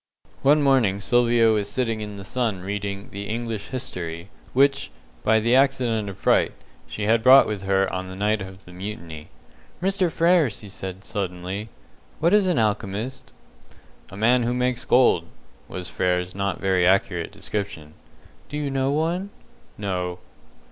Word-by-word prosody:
One 145 +2 +4
morning 125 -8 +3
Sylvia 120 +1 +3
was 105 -2 0
sitting 115 -1 -1
in 105 -1 -6
the 100 - -8
sun 110 -4 -1
reading 100 +1 -4
the 100 +1 -6
"English 115 -2 -3
History", 90 -8 -5 0.2
which, 140 +1 +2 0.3
by 110 0 +3
the 115 +3 +2
accident 125 -6 +2
of 100 - -8
fright, - - +2 0.3
she 105 - -5
had 110 +2 +3
brought 130 +3 +8
with 105 -2 -3
her 95 0 +2
on 95 0 -3
the 95 - -8
night 105 +2 0
of 95 0 -9
the 90 - -13
mutiny. 85 -5 -7 0.5
"Mr. 190 -1 +1
Frere," 170 -3 +4
said 95 -2 -8
she, - - -15
suddenly, 95 +1 -4 0.5
"what 170 +4 +3
is 205 -2 +5
an 180 - +1
alchemist?" 110 +4 -2 0.8
"A 100 - -10
man 120 +4 +4
who 120 +1 0
makes 125 -1 -1
gold," 125 -9 +4 0.4
was 90 -1 -6
Frere's 90 -1 -1
not 100 -2 -2
very 95 -2 +2
accurate 90 -2 +1
definition. 80 -8 -5 0.6
"Do 150 - -4
you 145 -2 -2
know 135 0 0
one?" 170 +6 -1 0.5
"No." 90 -3 -3
105 Hz, 155 wpm, -24 LUFS, 95-125 Hz, 0.8 s, brought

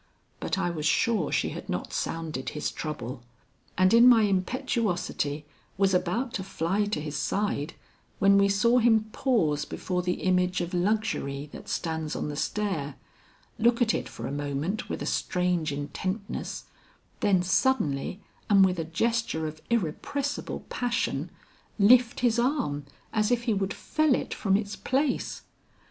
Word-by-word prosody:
But - - -2
I 175 -2 0
was 155 -2 -2
sure 210 -3 +2
she - - +1
had - - -8
not - - -3
sounded 160 -5 -3
his 150 - -3
trouble, 135 -5 -5 0.6
and 185 +2 +4
in 235 +2 +8
my 230 -3 +6
impetuosity 190 - -1 0.3
was 195 -1 +3
about 185 +8 0
to 190 - -2
fly 195 +2 0
to 205 -6 -2
his 150 -1 -5
side 170 -1 -1 0.4
when 200 0 +5
we 200 0 +4
saw 235 +5 +4
him 220 -2 +3
pause 180 - +1
before 180 -1 -3
the 180 0 -2
image 180 0 +2
of 175 +1 -3
Luxury 175 -7 -1
that - - -10
stands 160 -2 -2
on - - -2
the 145 - -4
stair, 155 -4 -2 0.6
look 235 +1 +3
at 235 -2 +3
it - - -3
for - - -7
a - - -3
moment 145 +7 -3
with - - -3
a - - -4
strange 180 -4 0
intentness, 185 +9 -4 0.6
then 195 -4 +3
suddenly 185 - +1 0.3
and 195 -2 +7
with 180 -2 0
a - - 0
gesture 200 -1 0
of 155 0 -6
irrepressible 255 - -2
passion, 245 -1 -1 0.5
lift 240 +4 +5
his 240 -2 +3
arm 240 - 0 0.3
as 215 -1 +2
if 240 -1 +1
he 235 -2 +1
would 195 -1 -1
fell 310 -4 +1
it - - -3
from 195 -1 +2
its 205 0 -4
place. 270 +1 -1
190 Hz, 155 wpm, -27 LUFS, 160-230 Hz, 0.6 s, in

